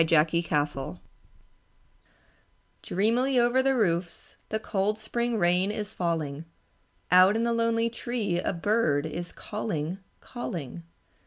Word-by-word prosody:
Twilight 160 0 +2 2.3
Dreamily 245 +7 +1
over 240 +2 +3
the 270 0 +2
roofs 175 -6 -1
The 220 - -1
cold 210 -1 -1
spring 235 +2 -2
rain 180 +1 +2
is 210 0 -4
falling; 160 -5 -2 0.7
Out 185 +3 +7
in 225 - +1
the 235 0 +1
lonely 230 0 +1
tree 230 -6 -2
A - - -1
bird 170 -6 +1
is 170 +3 -5
calling, 190 -5 -4 0.2
calling. 175 - -6
200 Hz, 110 wpm, -27 LUFS, 170-230 Hz, 2.3 s, Out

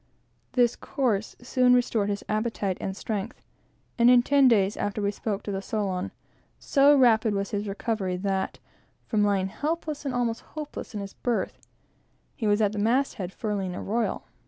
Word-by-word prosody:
This 245 -2 +3
course 225 -6 -1
soon 250 0 +4
restored 230 -4 +1
his 205 0 -2
appetite 215 -3 -1
and 190 0 -4
strength; 215 +1 -4 0.6
and 235 +1 +7
in 245 -1 +7
ten 280 0 +5
days 205 -4 +3
after 205 +1 -2
we 200 -1 +1
spoke 205 -1 -3
the 195 -2 -3
Solon, 195 -3 -2 0.5
so 285 0 +4
rapid 225 -4 +4
was 200 0 -2
his 205 0 -2
recovery, 195 -2 -2
that, 190 0 -2 0.5
from 215 -3 +1
lying 195 -2 +1
helpless 305 - -3
and 270 -3 -2
almost 235 -2 0
hopeless 300 -7 -8
in 205 - -3
his 200 0 -7
berth, 240 -2 -2 0.8
he 225 -7 -2
was 205 +1 +3
at 205 -2 +3
the 210 - -4
mast 245 +6 +2
head, 180 0 -4
furling 195 -4 -3
a - - -5
royal. 230 +3 -1
215 Hz, 170 wpm, -26 LUFS, 200-245 Hz, 0.8 s, and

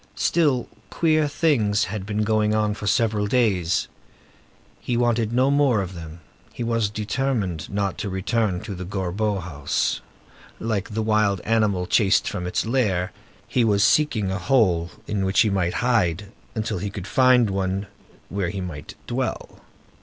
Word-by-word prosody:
Still, 145 -7 +1 0.2
queer 155 +1 +2
things 120 -9 +2
had 100 0 -4
been 105 0 0
going 110 0 +2
on 105 -1 +1
for 105 0 -6
several 110 -2 +1
days. 100 -8 +1 0.9
He 120 - -2
wanted 120 -2 +1
no 130 +3 +3
more 140 -6 +3
of 95 -1 -4
them. 85 -1 -9 0.3
He - - -5
was 115 -3 0
determined 105 - -2
not 100 -1 -2
to 100 - -3
return 95 0 -1
to 100 - -6
the 90 0 -6
Gorbeau 100 +3 -2
house. 75 -5 -1 0.6
Like 110 -3 -2
the 110 - 0
wild 105 -3 +2
animal 105 -5 +1
chased 100 +1 +3
from 90 -3 -3
its 90 - -1
lair, 105 -7 0 0.4
he 125 - +1
was 100 -3 +3
seeking 110 -11 +2
a 95 - -2
hole 90 -5 +2 0.2
in 105 -2 -2
which 95 +1 +3
he 110 - +2
might 90 -3 0
hide 100 -5 +1 0.2
until 110 -3 -2
he 100 +3 -3
could 100 -2 -7
find 125 -3 +4
one 95 +1 -1 0.4
where 95 -3 -2
he 100 - -5
might 85 -6 -7
dwell. - - -4
105 Hz, 160 wpm, -23 LUFS, 95-115 Hz, 0.9 s, find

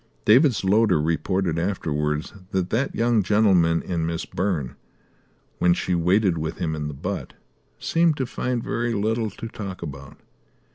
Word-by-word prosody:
David's 125 +2 +5
loader 100 -3 +4
reported 85 +2 0
afterwards 75 -4 -2 0.2
that 95 -2 -1
that 130 +5 0
young 115 -1 +2
gentleman 95 -5 +3
and 85 -3 -2
Miss 85 0 -3
Byrne, 85 -9 -2 0.8
when 90 0 +4
she 90 - -1
waited 90 +1 +2
with 80 +1 -4
him 80 -3 -2
in 75 -1 -3
the 75 - -6
butt, - - -5 0.4
seemed 165 -2 +2
to 130 - -1
find 125 -1 -2
very 120 0 -1
little 110 +2 0
to 110 +3 -8
talk 100 -5 -7
about. 70 -3 -8
95 Hz, 150 wpm, -24 LUFS, 80-110 Hz, 0.8 s, David's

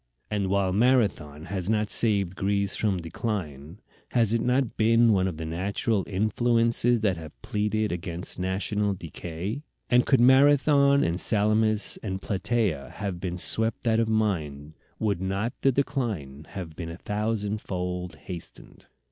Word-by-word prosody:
And 100 -2 0
while 95 -1 +1
Marathon 100 - +1
has 95 +1 -2
not 105 -1 +1
saved 100 -5 +2
Greece 100 0 0
from 105 -4 0
decline, 85 - -5 0.3
has 115 -3 +3
it 115 - +1
not 125 0 0
been 115 +1 +4
one 95 -1 +2
of 85 -4 -4
the 80 - -5
natural 95 +5 -1
influences 115 +3 +1
that 95 -5 +1
have 80 -2 -11
pleaded 105 +1 -1
against 85 +1 -4
national 100 +2 -1
decay? 85 - -6 0.3
And 125 0 +5
could 135 - +3
Marathon 140 +2 +5
and 85 +2 0
Salamis 110 0 +2
and 95 -3 -4
Platæa 100 - -1
have 95 -3 -4
been 90 -1 -4
swept 110 +8 +1
out 115 -1 +3
of 115 -1 +1
mind, 80 -9 -1 0.2
would 100 -4 -1
not 95 +5 -2
the 135 - +4
decline 110 - -3
have 85 -5 -7
been 85 -1 -6
a 85 - -7
thousandfold 100 -5 -3
hastened? 85 +3 -9
100 Hz, 145 wpm, -26 LUFS, 90-115 Hz, 0.3 s, And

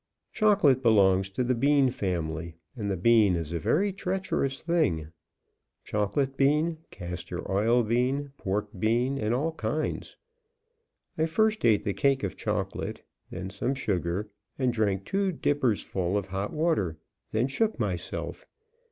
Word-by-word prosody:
Chocolate 195 - +4
belongs 95 -5 +4
to 100 +6 -1
the 125 +1 +1
bean 140 +1 +3
family, 85 -6 -3 0.2
and 105 -4 -3
the 95 - -1
bean 105 -1 +4
is 80 -2 -3
a 85 - -1
very 185 - +1
treacherous 185 -8 -1
thing 150 - +1 0.7
chocolate 105 +7 -1
bean, 150 +4 +2
castor 90 -1 -6
oil 115 +5 +3
bean, 130 +5 0
pork 105 -2 -2
bean, 120 +6 +1
and 110 0 0
all 140 +7 +1
kinds. 155 0 -3 1.0
I 160 - +3
first 220 +6 +1
ate 110 -3 +4
the 100 - -1
cake 135 +1 +2
of 95 - -2
chocolate, - - -3 0.3
then 95 +2 -6
some 125 +7 -1
sugar, 95 -5 -1 0.3
and 130 -3 +1
drank 100 -4 0
two 195 -1 0
dippersful 110 - 0
of 100 -1 -3
hot 95 +2 -3
water, 155 - 0 0.3
then 115 +4 +1
shook 215 - 0
myself. 90 -6 -4
115 Hz, 140 wpm, -28 LUFS, 95-140 Hz, 1.0 s, Chocolate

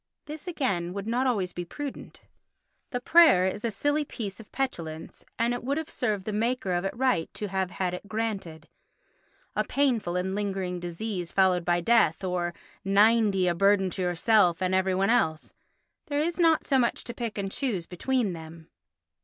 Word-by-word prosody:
This 305 +4 -8
again 195 - -1
would 200 0 -5
not 240 +4 0
be - - +3
always 195 -8 0
prudent. 260 - -7 0.7
The 245 - -2
prayer 305 - +6
is 190 +3 -2
a 230 - +1
silly 290 +8 0
piece 215 -8 -6
of 220 - -13
petulance 165 -12 -4
and 235 +1 +1
it 245 - -4
would 275 +4 -1
have 320 -1 -4
served 210 -6 -2
the 215 - -3
maker 225 -2 0
of 175 +1 0
it 195 - -3
right 255 -10 +1
to 210 - -4
have 190 -1 -1
had 180 -1 -2
it 180 +3 -7
granted. 200 -8 -4 0.9
"A - - +2
painful 245 -11 0
and 185 +1 -1
lingering 195 -3 -2
disease 175 +1 -4
followed 185 -2 +3
by 175 0 +1
death" 215 -4 +3
or 175 -2 -2 0.3
"Ninety, 205 -1 +4
a 175 - +2
burden 195 +1 +3
to 190 - -4
yourself 180 0 +3
and 185 0 0
every 190 0 +2
one 195 +3 +2
else"—there 235 - -3
is 335 +3 -1
not 325 -2 +4
so 270 -2 +3
much 235 - 0
to 235 - -6
pick 230 -3 -5
and 195 -1 -3
choose 210 -11 -1
between 220 +3 -1
them. 160 0 -11
200 Hz, 180 wpm, -27 LUFS, 180-245 Hz, 0.9 s, prayer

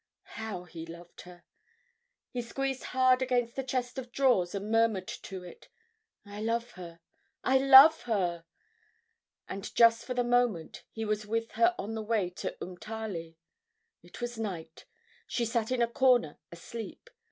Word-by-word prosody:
How 215 -5 -5
he 165 -2 -9
loved 170 +1 -11
her! 175 -1 -15 0.9
He 245 - -3
squeezed 270 +2 -3
hard 255 0 +3
against 245 -2 0
the 270 - -2
chest 255 0 -3
of 245 -1 -8
drawers 235 -9 +2
and 200 +2 -4
murmured 225 -4 +2
to 190 -2 -7
it, 175 - -13 0.6
"I 205 +1 -8
love 230 +2 -1
her, 170 -2 -11 0.4
I 265 0 +4
love 275 +4 +9
her!" 175 -7 -1 1.0
And 195 +2 -7
just 230 -1 +5
for 250 - -5
the 245 - +2
moment 240 -8 0
he 225 0 -5
was 215 0 -2
with 225 +1 -2
her 350 0 +3
on 210 +3 -5
the 220 - -3
way 210 -4 0
to 180 - -5
Umtali. 180 -3 -6 0.7
It - - -13
was 240 -1 -4
night. 170 -7 -6 0.4
She 235 - -1
sat 230 0 -1
in 250 -2 +2
a - - +2
corner 240 - +2
asleep. 210 +7 -8
225 Hz, 155 wpm, -30 LUFS, 185-245 Hz, 1.0 s, love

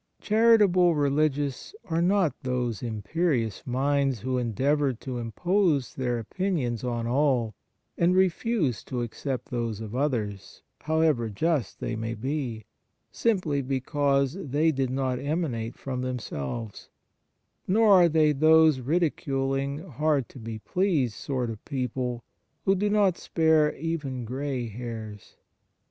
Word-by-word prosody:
Charitable 210 -6 +4
religious 145 - 0
are 165 -3 0
not 180 -4 +3
those 125 -5 -2
imperious 115 - -1
minds 135 -1 +1
who 130 +1 -1
endeavour 135 +4 +1
to 125 +1 -6
impose 155 - 0
their 125 -2 -1
opinions 125 - -2
on 120 -2 -2
all 125 -3 +1 0.5
and 175 +2 +3
refuse 185 - +1
to 125 -2 -3
accept 130 +4 -5
those 115 -4 -2
of 110 +1 -6
others, 110 -8 -2 0.2
however 155 -7 +1
just 145 - -1
they 120 - -3
may 115 +1 -3
be, 125 -3 -3 0.5
simply 180 -11 0
because 140 +1 0
they 155 -2 +1
did 135 -3 -1
not 130 -1 -1
emanate 140 -7 -2
from 130 -2 -4
themselves, 115 - -5 0.8
nor 215 +3 +4
are 175 -3 +7
they 155 -1 +4
those 155 0 +5
ridiculing, 140 -1 -1
hard 150 -2 0
to 130 - -12
be 115 -1 -6
pleased 155 - 0
sort 125 -1 -3
of 110 - -9
people 125 -3 -3 0.4
who 195 - +4
do 205 +2 0
not 205 -4 +2
spare 160 -2 +2
even 145 -6 -3
grey 130 0 -3
hairs. 110 -2 -8
135 Hz, 125 wpm, -27 LUFS, 120-160 Hz, 0.8 s, are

